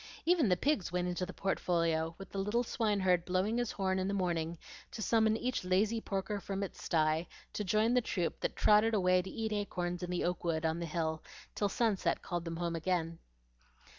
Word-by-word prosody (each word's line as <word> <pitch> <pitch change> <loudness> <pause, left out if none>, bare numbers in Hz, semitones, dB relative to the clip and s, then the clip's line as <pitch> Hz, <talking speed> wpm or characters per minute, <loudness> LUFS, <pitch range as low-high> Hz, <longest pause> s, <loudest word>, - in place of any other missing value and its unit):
Even 330 - +4
the 180 - +3
pigs 275 - 0
went 180 0 0
into 180 0 -2
the - - -6
portfolio, 165 -4 0
with 195 - -10
the 195 - -3
little 210 +5 +1
swineherd 200 -7 +1
blowing 185 +6 0
his 240 -2 -1
horn 190 -1 0
in 185 - -1
the 200 - -1
morning 170 -3 -1 0.3
to - - -9
summon 220 0 +3
each 250 -1 -2
lazy 205 +5 +2
porker 195 +1 -2
from 195 0 -3
its 195 - -7
sty 160 0 +1 0.3
to 210 - -2
join 215 +4 +2
the 250 - +4
troop 180 -6 -2
that - - -2
trotted 215 +2 +4
away 185 -2 +4
to 190 - -8
eat 220 0 -3
acorns 180 -4 -2
in 180 - -4
the 180 -1 -1
oak 180 0 -1
wood 165 -2 0
on 160 +1 0
the 170 - -3
hill 160 -1 -2 0.3
till 205 - 0
sunset 215 -2 0
called 175 -2 -3
them 165 0 -4
home 170 0 -2
again. 165 -1 -1
185 Hz, 205 wpm, -33 LUFS, 175-210 Hz, 0.3 s, Even